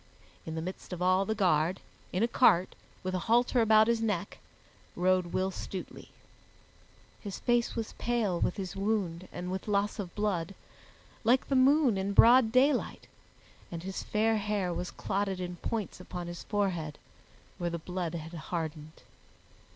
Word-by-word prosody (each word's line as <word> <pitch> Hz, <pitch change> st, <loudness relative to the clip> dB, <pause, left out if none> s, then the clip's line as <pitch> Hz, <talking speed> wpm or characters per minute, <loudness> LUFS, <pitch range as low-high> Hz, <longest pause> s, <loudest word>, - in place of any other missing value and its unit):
In 160 Hz, -, -4 dB
the 160 Hz, -, -3 dB
midst 185 Hz, +1 st, -7 dB
of 180 Hz, -, -6 dB
all 185 Hz, +1 st, +3 dB
the 220 Hz, -, -1 dB
guard, 175 Hz, -2 st, +2 dB, 0.3 s
in 185 Hz, +4 st, 0 dB
a -, -, +4 dB
cart, 190 Hz, -7 st, +4 dB, 0.3 s
with 185 Hz, 0 st, -2 dB
a 185 Hz, -, 0 dB
halter 240 Hz, +1 st, +4 dB
about 220 Hz, -1 st, +6 dB
his 230 Hz, 0 st, +1 dB
neck, 205 Hz, -4 st, -2 dB, 0.6 s
rode 185 Hz, 0 st, +2 dB
Will 185 Hz, +2 st, -1 dB
Stutely. 185 Hz, 0 st, -7 dB, 1.1 s
His 200 Hz, -3 st, -6 dB
face 240 Hz, -1 st, +1 dB
was 225 Hz, -2 st, -4 dB
pale 225 Hz, -7 st, 0 dB
with -, -, 0 dB
his 190 Hz, -3 st, -5 dB
wound 195 Hz, -4 st, -1 dB
and 180 Hz, +1 st, -5 dB
with 190 Hz, +2 st, -4 dB
loss 205 Hz, 0 st, 0 dB
of 180 Hz, -4 st, -5 dB
blood, 195 Hz, -4 st, -1 dB, 0.7 s
like 245 Hz, +3 st, +3 dB
the 275 Hz, -, +2 dB
moon 260 Hz, -4 st, +4 dB
in 195 Hz, +1 st, -1 dB
broad 235 Hz, +1 st, +7 dB
daylight, 260 Hz, +2 st, +2 dB, 0.7 s
and 170 Hz, -1 st, -6 dB
his 190 Hz, 0 st, -4 dB
fair 220 Hz, +1 st, +1 dB
hair 205 Hz, -4 st, -1 dB
was 180 Hz, -, -3 dB
clotted 195 Hz, -1 st, -2 dB
in 180 Hz, -1 st, -5 dB
points 215 Hz, +1 st, -4 dB
upon 180 Hz, -1 st, -6 dB
his 175 Hz, 0 st, -7 dB
forehead, 180 Hz, -8 st, -1 dB, 0.6 s
where 175 Hz, -1 st, -1 dB
the 170 Hz, -, -3 dB
blood 175 Hz, 0 st, -4 dB
had 160 Hz, 0 st, -7 dB
hardened. 160 Hz, -2 st, -5 dB
190 Hz, 160 wpm, -30 LUFS, 175-220 Hz, 1.1 s, broad